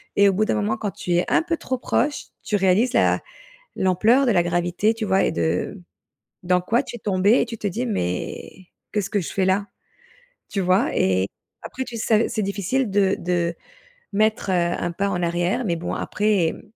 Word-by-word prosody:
et 200 0 +6
au - - +1
bout 215 +3 +1
d'un - - 0
moment 215 +1 0
quand 210 -2 -3
tu 180 - -3
es 175 +1 +2
un - - +4
peu 330 0 -2
trop 260 -4 -3
proche, 290 +4 0 0.2
tu 210 - -1
réalises 200 +6 +3
la - - +3 0.6
l'ampleur 215 +9 +3
de 240 - +3
la 175 -3 +4
gravité, 175 +5 0
tu 225 -1 -4
vois? 195 -1 +2
Et - - +2
de 85 - -1 0.6
dans 180 0 +2
quoi 230 +7 +1
tu 250 - -8
es - - -9
tombée 200 +3 +3
et - - +1
tu 230 -1 -7
te 210 - -3
dis: 230 +6 -2
«Mais 180 - -4 0.3
qu'est-ce 200 -2 -1
que 205 - 0
je 175 - -5
fais 195 - +1
là?» 195 +2 +1 0.8
tu 200 - -2
vois? 185 +1 +2
Et 95 0 +2 0.4
après 260 - -5
tu 240 -2 -8
sais 220 0 +2
c'est 215 - -2
difficile 200 +5 -1
de 195 -1 +2
de, 170 -1 -1 0.6
mettre, 215 -1 +1
heu, - - +2
1 175 -1 0
pas 200 +4 -1
en 180 -2 -2
arrière, 175 +8 0
mais 175 -4 0
bon, 165 - -4
après, 205 -6 +1
mmh, - - -12
200 Hz, 210 wpm, -23 LUFS, 175-220 Hz, 0.8 s, et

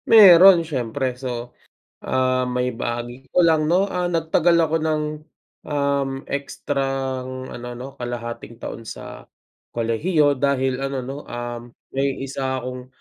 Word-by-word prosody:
Meron 190 -5 +9
siyempre. 130 -2 -2
So, 125 -1 -6 0.5
ah, 130 0 +1
maibahagi 125 0 -3
ko 180 - +5
lang, 160 -2 +4
'no, 185 +5 +2
ah, 180 -1 -1
nagtagal 170 0 +2
ako 160 0 +1
ng, 155 -1 0 0.6
um, 140 -2 0 0.2
ekstrang 135 -2 -3
ano, 120 0 -7
'no, 125 +2 -7
kalahating 120 -1 -5
taon 115 - -6
sa - - -9 0.5
kolehiyo 145 +6 +2
dahil 135 -1 +1
ano, 135 0 -2
'no, 135 +3 -6
um, 120 0 -5 0.3
may 135 0 0
isa 130 -1 -3
akong, 125 0 -6
135 Hz, 125 wpm, -22 LUFS, 125-155 Hz, 0.6 s, Meron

